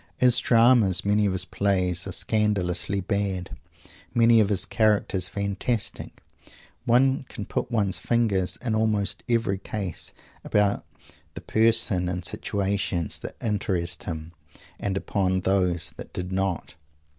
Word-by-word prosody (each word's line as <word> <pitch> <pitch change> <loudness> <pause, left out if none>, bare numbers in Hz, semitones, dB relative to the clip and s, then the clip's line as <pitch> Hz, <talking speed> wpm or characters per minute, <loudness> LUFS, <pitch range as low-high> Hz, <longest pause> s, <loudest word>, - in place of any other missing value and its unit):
As 125 -1 +5
Dramas, 115 -6 +4
many 105 +1 +3
of 95 - 0
his 90 -1 -1
plays 90 -1 0
are - - -4
scandalously 100 -2 0
bad; 95 -1 -2 0.6
many 115 0 +6
of 105 -2 +3
his 100 -3 0
characters 105 -5 +1
fantastic. 100 +3 -3 0.6
One 130 +2 +3
can 105 - -6
put - - -3
one's 105 -6 0
finger 110 -6 +1 0.2
in 115 - 0
almost 105 -2 0
every 115 -5 +1
case 95 -3 -4 0.3
upon 105 -1 +2 0.5
the 85 - -7
persons 110 -2 +2
and 90 0 -4
situations 95 -4 -1
that - - -7
interested 95 -5 -1
him 80 -1 -5 0.5
and 95 -1 -2
upon 95 -2 0
those 90 -3 +1
that - - -9
did 90 +1 -4
not. 95 -2 -2
100 Hz, 130 wpm, -25 LUFS, 90-110 Hz, 0.6 s, many